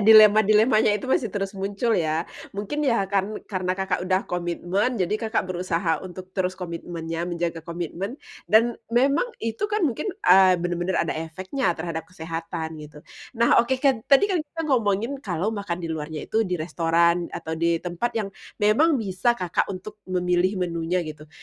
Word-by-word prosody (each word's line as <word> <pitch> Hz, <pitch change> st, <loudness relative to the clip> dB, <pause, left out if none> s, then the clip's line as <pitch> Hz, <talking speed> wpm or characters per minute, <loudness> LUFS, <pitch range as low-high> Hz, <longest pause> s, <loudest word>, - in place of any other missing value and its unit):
dilema-dilemanya 215 Hz, +1 st, +6 dB
itu 270 Hz, -, -8 dB
masih 230 Hz, -, +1 dB
terus 195 Hz, 0 st, -3 dB
muncul 205 Hz, +4 st, 0 dB
ya, 160 Hz, +2 st, 0 dB, 0.3 s
mungkin 210 Hz, +9 st, -3 dB
ya 235 Hz, -, +3 dB, 0.2 s
karen 200 Hz, +2 st, 0 dB
karena 185 Hz, -2 st, -2 dB
Kakak 190 Hz, -1 st, -1 dB
udah 185 Hz, 0 st, +3 dB
komitmen 175 Hz, +5 st, -1 dB
jadi 185 Hz, +3 st, +1 dB
Kakak 225 Hz, 0 st, 0 dB
berusaha 175 Hz, -1 st, -1 dB
untuk 185 Hz, 0 st, -8 dB
terus 185 Hz, -1 st, -1 dB
komitmennya, 170 Hz, -1 st, -5 dB
menjaga 170 Hz, -1 st, -2 dB
komitmen. 175 Hz, -, -5 dB, 0.3 s
Dan 230 Hz, +3 st, +5 dB, 0.2 s
memang 275 Hz, -, +2 dB
itu 225 Hz, -, -4 dB
kan 420 Hz, -4 st, +2 dB
mungkin, 295 Hz, -, -1 dB, 0.2 s
eee, 185 Hz, 0 st, +7 dB
bener-bener 175 Hz, +1 st, -1 dB
ada -, -, +1 dB
efeknya 185 Hz, -, -4 dB
terhadap 160 Hz, 0 st, -5 dB
kesehatan 165 Hz, -1 st, -5 dB
gitu. 150 Hz, 0 st, -11 dB, 0.4 s
Nah, 235 Hz, +1 st, +5 dB
oke 250 Hz, +3 st, 0 dB
kat 260 Hz, -3 st, +2 dB
tadi 275 Hz, +7 st, +6 dB
kan 360 Hz, -, +2 dB
kita 310 Hz, +2 st, -7 dB
ngomongin 230 Hz, -5 st, +1 dB
kalau 190 Hz, -, -2 dB
makan 200 Hz, -5 st, -3 dB
di -, -, -3 dB
luarnya 155 Hz, 0 st, -5 dB
itu 220 Hz, -, 0 dB
di 180 Hz, -, 0 dB
restoran, 170 Hz, +1 st, +1 dB
atau 160 Hz, -, -5 dB
di 170 Hz, +1 st, +1 dB
tempat 180 Hz, +7 st, -2 dB
yang 210 Hz, -3 st, -1 dB, 0.4 s
memang 290 Hz, +10 st, +4 dB
bisa 220 Hz, +1 st, 0 dB
Kakak 180 Hz, -5 st, -1 dB
untuk 200 Hz, +2 st, -7 dB
memilih 180 Hz, +1 st, +1 dB
menunya 170 Hz, +1 st, -1 dB
gitu. 150 Hz, -1 st, -9 dB
185 Hz, 160 wpm, -24 LUFS, 170-220 Hz, 0.4 s, eee